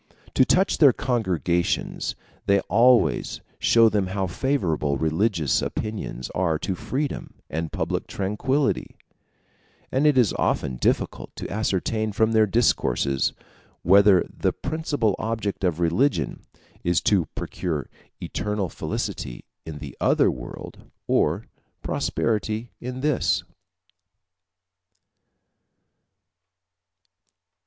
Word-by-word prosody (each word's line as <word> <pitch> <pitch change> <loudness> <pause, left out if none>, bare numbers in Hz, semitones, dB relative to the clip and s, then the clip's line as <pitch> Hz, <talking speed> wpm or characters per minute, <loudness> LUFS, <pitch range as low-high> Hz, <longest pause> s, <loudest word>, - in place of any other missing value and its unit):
To - - +5
touch 185 +8 +2
their 140 -5 +7
congregations, 90 -8 -1 0.3
they 100 0 +5
always 115 - +3 0.2
show 115 -1 +5
them 105 -3 +1
how 95 +1 -1
favorable 85 - 0
religious 80 +1 +1
opinions 100 - -4
are 85 -4 0
to 95 - -2
freedom 135 - -4 0.2
and 80 +1 -3
public - - -2
tranquillity; 130 +9 -1 1.0
and 135 +4 +3
it 145 -3 +4
is 120 -6 +4
often 65 -2 0
difficult - - -1
to - - -6
ascertain 110 +1 -1
from 110 +2 +2
their 110 -1 +4
discourses 90 - +1 0.5
whether 100 +1 +6
the - - -1
principal 145 - -1
object 110 -3 -3
of 90 -3 +1
religion 85 - +1 0.4
is 85 -1 +2
to 95 -6 +3
procure 80 -6 -3 0.3
eternal 105 -3 -2
felicity - - -4 0.2
in 80 -2 -6
the - - -8
other - - +4
world, 60 - -9 0.2
or - - +1 0.4
prosperity 110 +1 -1
in 125 +1 -5
this. 150 -3 +1
105 Hz, 100 wpm, -24 LUFS, 85-120 Hz, 1.0 s, their